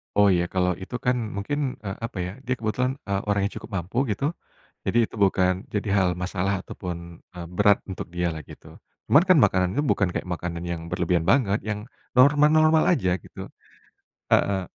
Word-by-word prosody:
Oh, 105 0 +5
ya, 90 -3 +3
kalau 90 -1 +1
itu 125 - -7
kan 125 0 +3 0.2
mungkin, 135 +6 -2
eee, 95 -2 -5
apa 115 - -8
ya, 90 +1 -3
dia 125 -1 -2
kebetulan, 125 +5 -1
eee, 100 0 0
orang 100 - +1
yang - - -11
cukup - - -8
mampu, 90 +7 -8
gitu, 105 +7 -2 0.6
jadi, 120 - +2
itu - - -11
bukan 95 -1 +2
jadi 105 0 -1
hal 95 - +3
masalah 95 +2 -2
ataupun, 85 -2 -7 0.2
eee, 85 -1 -7
berat 100 +3 +3
untuk 95 - -5
dia 90 0 0
lah, 80 - -5
gitu. - - -14 0.3
Cuman 145 - +7
kan 185 - +6
makanan 95 -2 +2
itu 145 - +1
bukan 100 -10 +1
kayak - - -1
makanan 85 -1 -4
yang 85 -1 -5
berlebihan 90 -1 0
banget, 110 -6 +3
yang 105 +3 -4 0.2
normal-normal 150 +4 +5
aja, 90 - 0
gitu. - - -10 0.8
Heeh, 95 -2 +3
100 Hz, 185 wpm, -25 LUFS, 90-120 Hz, 0.8 s, Cuman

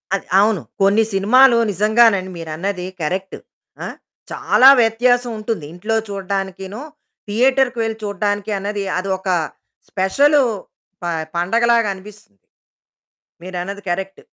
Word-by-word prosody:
అది 195 - -5
అవును. 210 -2 +2 0.2
కొన్ని 200 +3 +4
సినిమాలు 235 +6 +5
నిజంగానండి 210 -1 +3
మీరన్నది 175 +3 -4 0.2
కరెక్టు. 185 +5 -3 0.5
ఆ! - - -4 0.4
చాలా 260 +2 +5
వ్యత్యాసవుంటుంది 230 -4 0
ఇంట్లో 215 +6 -3
చూడ్డానికినూ, 195 +1 -4 0.5
థియేటర్‌కి 255 +3 +2
వెళ్లి 225 -1 -3
చూడడానికి 205 0 -2
అన్నది 200 +1 -3
అది 190 +2 -3
ఒక 190 +1 -11 0.6
స్పెషలూ 280 +10 +3 0.6
ప - - -4 0.3
పండగలాగనిపిస్తుంది. 210 - -1 1.1
మీరన్నది 185 +2 -6
కరెక్టు. 190 +2 -4
205 Hz, 95 wpm, -19 LUFS, 190-225 Hz, 1.1 s, సినిమాలు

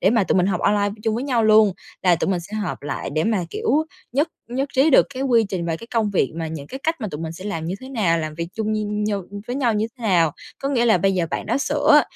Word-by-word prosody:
để 190 - +4
mà 225 -3 +3
tụi - - +1
mình 180 -1 +3
học 195 - 0
online 205 0 +2
chung 220 -1 0
với 240 +4 -2
nhau 245 -5 +1
luôn, 215 -2 +6 0.3
là 180 -2 +4
tụi 180 - -1
mình 180 -2 0
sẽ 195 +5 -9
họp 205 -4 -3
lại 145 0 -4
để 155 +2 0
mà, 215 -5 +1
kiểu, 300 +6 +1 0.3
nhất 290 +5 +2 0.2
nhất 265 +4 -2
trí 275 +4 +4
được 260 - +6
cái 260 - -3
quy 240 -4 +4
trình 180 -4 -3
và 165 -1 -1
cái 230 - -11
công 220 -3 +2
việc 185 -9 +1
mà 165 0 -3
những 155 -3 -6
cái 265 - -7
cách 325 +1 -1
mà 215 - -2
tụi 150 - -6
mình 160 -1 -4
sẽ 185 +3 -10
làm 200 -6 -3
như 175 - -2
thế 260 - -9
nào, 200 -11 +1
làm 155 -1 -4
việc 170 +1 -4
chung 215 -1 -1
nh 210 -1 -1
như 205 -2 -1 0.2
với 245 - -3
nhau 245 -5 +1
như 210 +1 +1
thế - - -12
nào. 175 -8 +3 0.3
Có 275 - 0
nghĩa 250 -4 +2
là 220 -6 +4
bây 195 +2 +2
giờ 175 -2 +1
bạn - - -3
đó - - +1
sửa, 295 +1 +4
210 Hz, 295 wpm, -22 LUFS, 175-240 Hz, 0.3 s, luôn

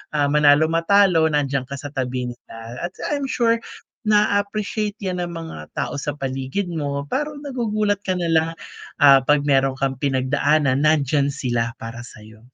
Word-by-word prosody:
ah, 145 -1 +2
manalo 150 +1 +5
matalo 165 -1 +4
nandiyan 140 -3 0
ka 140 - -6
sa 145 - -6
tabi 125 -1 -2
nila 120 -1 -14 0.3
at - - -16 0.2
I'm 285 -1 -1
sure 230 -2 +2 0.5
na-a-appreciate 210 0 +1
yan 180 -1 -2
ng 175 - -5
mga 165 - -7 0.2
tao - - -2
sa 145 - -2
paligid 135 +7 -3
mo 140 -3 -3
parang 295 - -3
nagugulat 215 -6 -1
ka 185 -1 0
nalang, 165 -1 +1 0.5
ah, 135 -1 +8
'pag 145 +1 +3
meron 135 -1 +2
kang 135 -1 0
pinagdaanan 140 +1 +1
nandiyan 145 -2 +2
sila 120 -4 -1
para 115 +1 -7
sayo. 110 -2 -14
150 Hz, 155 wpm, -21 LUFS, 135-200 Hz, 0.5 s, ah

